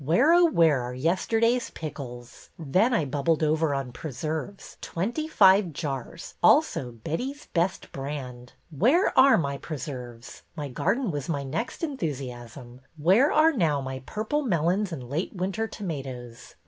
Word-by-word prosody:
Where, 240 - +4
oh, 350 0 +6
where, 165 - +3
are 125 +1 -5
yesterday's 225 - +1
pickles? 125 -6 -8
Then 185 - +2
I 170 -10 +1
bubbled 145 +4 0
over 155 -1 +1
on 135 -2 -3
preserves. 155 +8 -6
Twenty 235 - -3
five 195 - +5
jars, 135 -5 -5
also 125 - +3
Betty's 250 - -5
Best 175 +2 -1
Brand. 130 -3 -7 0.2
Where 255 - +3
are 265 +1 +7
my 140 -4 -2
preserves? 125 -6 -7
My 145 -3 -5
garden 205 - 0
was 145 -1 -4
my 145 -4 -1
next 195 - -4
enthu 270 - -2
siasm. 125 -1 -9 0.2
Where 190 - +4
are 315 +1 +5
now 160 - +1
my 130 -1 -5
purple 220 +8 -1
melons 185 - 0
and 130 -7 -6
late 155 +10 -3
winter 195 +5 -2
tomatoes 135 - -7
160 Hz, 145 wpm, -26 LUFS, 135-210 Hz, 0.2 s, are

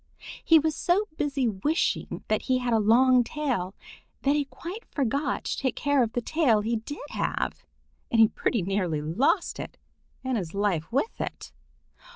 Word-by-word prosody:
He 325 - +6
was 315 0 +1
so 375 +5 +2
busy 280 -4 0
wishing 230 - -1
that - - +1
he 255 -1 +1
had 245 -2 -1
a 225 - +4
long 245 +4 +5
tail 235 -9 -2 0.5
that 280 +1 +3
he 290 -1 +1
quite 340 - -8
forgot 275 +1 -1
to - - -3
take 260 -2 -1
care 285 -1 +2
of 230 -2 0
the 245 - 0
tail 255 -10 +2
he 230 +2 0
did 290 +7 -7
have, - - -2 0.5
and 230 - +2
he 220 - +8
pretty 215 -1 -1
nearly 180 -4 0
lost 240 - +1
it - - -7 0.5
and 260 -3 0
his 175 -1 -6
life 200 -5 0
with 275 - -1
it. - - -6
255 Hz, 175 wpm, -27 LUFS, 215-290 Hz, 0.5 s, he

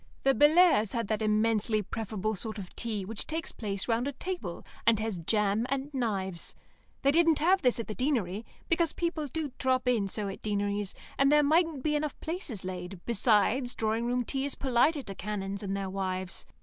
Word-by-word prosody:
The 270 - +5
Bellairs' 295 - +5
had 230 -2 0
that 215 0 0
immensely 215 0 +2
preferable 215 0 -3
sort 220 +2 -4
of 190 -3 -8
tea 215 -5 -2
which 215 +1 -5
takes 325 +1 -2
place 200 -3 -3
round 235 +2 +1
a - - -1
table, 260 - -5 0.2
and 230 -1 +6
has 215 -4 -2
jam 210 +5 +1
and 275 +2 -2
knives. 195 -9 -2 0.5
They 275 - +5
didn't 330 0 +4
have 370 +5 +3
this 250 -3 +2
at 230 - -2
the 215 - -5
Deanery, 225 -6 -1 0.2
because 330 -1 +2
people 335 -3 -2
do 300 +1 -3
drop 255 -1 +1
in 230 -5 +2
so 205 +1 -2
at 195 - -6
Deaneries, 205 -1 -1 0.2
and 275 +1 +5
there 295 0 +6
mightn't 315 -2 +2
be 300 -1 +1
enough 295 -1 -2
places 315 - -4
laid, 180 0 -5
besides, 235 +3 +2
drawing 225 +2 0
room 245 0 0
tea 270 +2 -1
is 285 - -2
politer 275 +3 +2
to 200 - -6
canons 200 0 -4
and 195 -1 -2
their 195 -1 -3
wives. 185 -1 -4
230 Hz, 190 wpm, -30 LUFS, 200-280 Hz, 0.5 s, and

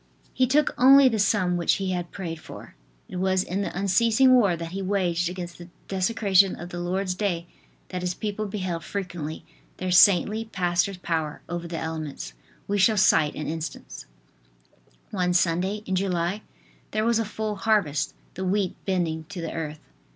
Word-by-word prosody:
He 255 0 +2
took 290 +3 +2
only 270 +2 +8
the 225 -3 -1
sum 190 -3 +2
which 170 - +2
he 195 -2 -1
had 175 -1 -3
prayed 165 -4 -6
for." - - -11 0.3
It - - -7
was 190 0 +1
in 190 +3 -3
the 195 - -4
unceasing 230 +6 +4
war 205 -8 +4
that 165 0 -6
he 195 +1 -4
waged 180 -3 0
against 175 -1 -7
the 175 0 -11 0.2
desecration 195 -1 +3
of 175 - -8
the 175 -1 -6
Lord's 185 +2 -1
day 180 -4 -2 0.4
that 180 -1 -4
his 180 0 -2
people 215 0 -3
beheld 185 -4 -3
frequently 175 -6 -5 0.3
their 185 0 -3
saintly 205 +4 +5
pastor's 180 -2 0
power 160 -4 -3
over 175 0 -4
the 165 -1 -5
elements. 155 - -5 0.3
We 205 0 0
shall 215 +3 +4
cite 155 -6 +4
an 150 - -4
instance: 160 -2 -6 1.0
One 180 -3 0
Sunday 185 +4 +1
in 190 - -3
July 185 +1 0 0.5
there 215 +1 -1
was 230 -1 +3
a - - +1
full 215 0 -4
harvest, 195 -9 +1 0.2
the 185 - -5
wheat 190 0 0
bending 170 -4 -1
to 200 0 -8
the 165 -1 -4
earth. 155 -2 -5
185 Hz, 175 wpm, -25 LUFS, 170-205 Hz, 1.0 s, only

